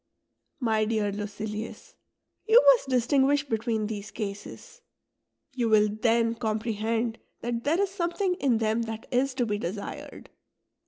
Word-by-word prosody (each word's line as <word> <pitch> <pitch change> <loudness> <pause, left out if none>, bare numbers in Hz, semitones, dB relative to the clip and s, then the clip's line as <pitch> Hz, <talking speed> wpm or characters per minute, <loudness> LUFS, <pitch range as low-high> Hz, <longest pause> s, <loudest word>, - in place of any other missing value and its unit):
My 220 -4 +1
dear 215 -2 0
Lucilius, 210 +2 -6 0.5
you 450 +2 +8
must 480 - +1
distinguish 275 +3 +2
between 225 -2 -1
these 210 -1 -5
cases; 205 - -7 0.7
you 240 -3 0
will 215 -1 +5
then 230 +2 +2
comprehend 225 0 -2 0.2
that 235 0 -3
there 320 +5 +2
is 400 -1 +1
something 360 +1 -1
in 255 -5 +2
them 220 +1 +1
that 225 0 -6
is 255 +1 +1
to 250 -2 +1
be 210 -2 -2
desired. 200 +1 -6
230 Hz, 130 wpm, -27 LUFS, 215-260 Hz, 0.7 s, you